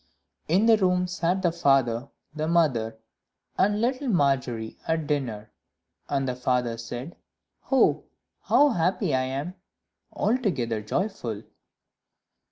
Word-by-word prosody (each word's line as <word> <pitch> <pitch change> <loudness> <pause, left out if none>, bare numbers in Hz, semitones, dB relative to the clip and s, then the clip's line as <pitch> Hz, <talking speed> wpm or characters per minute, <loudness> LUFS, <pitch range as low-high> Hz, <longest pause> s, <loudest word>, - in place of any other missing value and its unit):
In 185 +7 +3
the 225 -1 +6
room 180 -2 +2
sat 180 +1 -1
the 175 - +3
father, 135 -6 +2 0.2
the 155 0 -2
mother, 130 -10 +1 0.6
and 205 +2 +2
little 255 +4 0
Margery 130 - 0
at 160 -1 0
dinner; 120 -8 -3 0.6
and 135 -1 0
the 125 - -2
father 125 -2 0
said, 120 +7 -7 0.6
"Oh, 270 - +3 0.4
how 290 +1 +4
happy 185 - 0
I 130 0 +2
am! 140 +7 -4 0.6
altogether 140 - 0
joyful." 115 - -3
150 Hz, 115 wpm, -26 LUFS, 125-185 Hz, 0.6 s, the